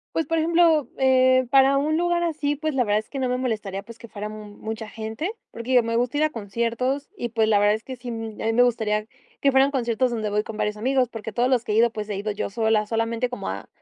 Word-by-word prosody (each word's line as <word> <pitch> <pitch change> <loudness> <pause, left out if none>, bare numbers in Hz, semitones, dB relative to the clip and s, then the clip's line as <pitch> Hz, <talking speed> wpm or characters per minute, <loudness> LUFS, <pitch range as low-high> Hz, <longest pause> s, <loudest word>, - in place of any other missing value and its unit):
Pues, 325 - 0
por 330 - 0
ejemplo, 325 -2 +3
eh, 260 -1 +4
para 270 0 +6
un 305 +3 +1
lugar 345 0 +1
así, 305 -3 -1
pues, 310 +1 -2
la 255 -2 +1
verdad 210 0 +2
es 215 - -10
que 275 - -5
no 260 - 0
me 250 - 0
molestaría, 215 -6 -3
pues, 230 +2 -12
que 235 - -12
fuera 210 -1 -6
m 210 -1 -9
mucha 220 0 -5
gente. 220 - -4 0.2
Porque 235 +3 -4
yo 245 -2 +6
me 230 0 -1
gusta 245 +3 0
ir 295 - +2
a 310 - +3
conciertos 235 +4 -2
y, 240 - -2
pues, 220 -1 +1
la 210 -2 +4
verdad 205 +1 +4
es 220 - -8
que 260 +1 -7
sí, 245 0 -7
mm, 225 -2 -6
a - - -3
mí 225 - +1
me 245 +2 +5
gustaría 215 -3 0 0.4
que 275 - +4
fueran 270 +1 +4
conciertos 250 -1 0
donde 220 -3 -2
voy 210 +1 0
con 220 - -8
varios 210 0 -1
amigos, 255 +2 +1
porque 220 -2 -7
todos 245 +3 +1
los 245 -3 +2
que 210 - -1
he - - +1
ido, 235 +2 +5
pues, 215 -2 -5
he 210 - -3
ido 205 +2 -2
yo 205 - -3
sola, 220 0 +1
solamente 230 +2 -1
como 250 - -5
a - - -6
235 Hz, 275 wpm, -24 LUFS, 220-265 Hz, 0.4 s, para